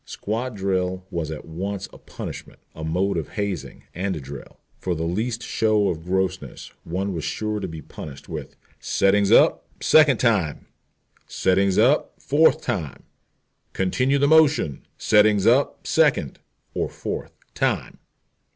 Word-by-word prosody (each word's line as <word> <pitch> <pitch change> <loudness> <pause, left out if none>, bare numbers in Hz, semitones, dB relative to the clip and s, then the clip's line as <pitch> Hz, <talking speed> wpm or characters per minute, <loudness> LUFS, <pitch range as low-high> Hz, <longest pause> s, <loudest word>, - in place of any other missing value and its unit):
Squad 115 +3 -4
drill 95 -1 -1
was 85 -4 -3
at 80 - -7
once 95 +4 -4
a - - -13
punishment, - - -8 0.2
a 80 - -8
mode 90 +5 0
of 80 - -5
hazing, 100 -5 -4
and 95 +2 -2
a - - -4
drill. 70 -1 -10 0.2
For 90 -2 -2
the 80 - -3
least 110 +8 -2
show 110 -2 +1
of 80 -2 -4
grossness 95 +1 -2
one 95 +4 -3
was 80 -3 -4
sure 110 -1 -2
to 95 - -4
be 80 -3 -8
punished 70 -1 -10
with - - -7 0.2
"settings 100 0 +2
up, - - +5
second 150 -5 +5
time!" 105 -12 +1 0.6
"settings 95 0 +1
up, 130 +7 +2
fourth 155 +2 +3
time! 80 - -4 0.7
"Continue 125 +9 +1
the 140 +1 +3
motion, 155 - +3
settings 105 -2 +4
up 125 +5 +2
second - - +2 0.3
(or - - -1
fourth) - - -6 0.2
time!" - - -1
95 Hz, 140 wpm, -23 LUFS, 85-110 Hz, 0.7 s, up